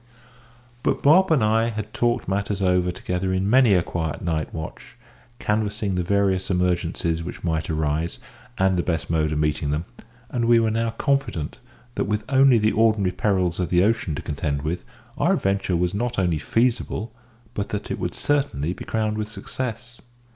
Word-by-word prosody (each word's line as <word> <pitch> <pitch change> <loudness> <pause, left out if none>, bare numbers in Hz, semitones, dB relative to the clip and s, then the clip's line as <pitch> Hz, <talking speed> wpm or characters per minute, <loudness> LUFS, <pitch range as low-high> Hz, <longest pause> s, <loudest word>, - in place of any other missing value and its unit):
But - - 0
Bob 180 +7 +6
and 155 -8 +3
I 110 +2 +3
had 110 -1 -5
talked 120 0 0
matters 100 +1 -1
over 90 -1 +2
together 90 +1 -2
in 95 +1 0
many 120 -2 +5
a 90 - +3
quiet 80 -3 -3
night 80 -3 -1
watch, 80 -1 -8 0.4
canvassing 105 -2 -1
the 90 - 0
various 95 0 +1
emergencies 90 -2 0
which 85 - -7
might 80 -2 -1
arise, 80 +1 -1 0.4
and 95 -1 +2
the - - +2
best 80 -3 -2
mode 80 -2 +1
of 75 - -1
meeting 75 -1 0
them; 75 +4 -1 0.5
and 120 -2 0
we 120 0 +5
were 110 -1 +2
now 115 +1 0
confident 115 - -1 0.3
that, - - -1
with 105 +1 -1
only 135 -2 +6
the 110 0 +2
ordinary 110 -4 +3
perils 95 -2 0
of 90 - -1
the 90 0 +4
ocean 105 -7 +1
to - - -6
contend 70 -1 -2
with, 80 +3 -2 0.4
our - - +3
adventure 95 -2 0
was 90 +1 0
not 120 +4 -2
only 90 -5 +1
feasible, 115 +2 0 0.4
but 100 0 -3
that 105 0 -4
it - - -3
would - - -3
certainly 135 - 0
be - - -9
crowned 110 -1 -1
with 105 0 -3
success. 125 +1 -6
95 Hz, 180 wpm, -23 LUFS, 85-115 Hz, 0.5 s, Bob